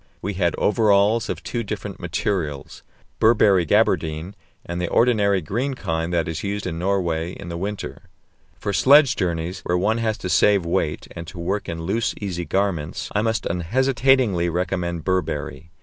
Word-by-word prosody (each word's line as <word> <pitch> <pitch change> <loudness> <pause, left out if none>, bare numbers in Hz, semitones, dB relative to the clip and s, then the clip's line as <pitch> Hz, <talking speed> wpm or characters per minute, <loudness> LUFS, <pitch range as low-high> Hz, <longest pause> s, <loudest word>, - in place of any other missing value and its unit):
We 100 +2 -3
had 90 -3 0
overalls 105 0 +3
of - - -4
two 120 - -3
different 105 - -6
materials: 75 -9 -3 0.4
Burberry 105 -5 +4
"gabardine" 80 +4 +1 0.3
and 85 +1 -4
the 90 - -1
ordinary 105 -5 +3
green 120 - -2
kind 80 -6 -2
that 85 -2 0
is 80 -1 -3
used 100 0 -3
in 85 -2 -3
Norway 90 -3 -1
in 85 - -9
the 85 - -5
winter. 100 +4 -5 0.5
For 100 - -3
sledge 140 +4 +6
journeys, 90 0 -2
where 90 - -1
one 110 +5 +1
has 110 -2 0
to - - -5
save 100 -1 +4
weight, 85 - -1
and 85 -1 -7
to - - -10
work 95 +4 -2
in 80 -1 -4
loose, 105 +5 -1
easy 90 -4 -4
garments, 95 -6 -1
I 105 - +2
must 115 +1 -1
unhesitatingly 120 0 +2
recommend 85 -1 -2
Burberry. 85 -3 -2
95 Hz, 165 wpm, -22 LUFS, 85-105 Hz, 0.5 s, sledge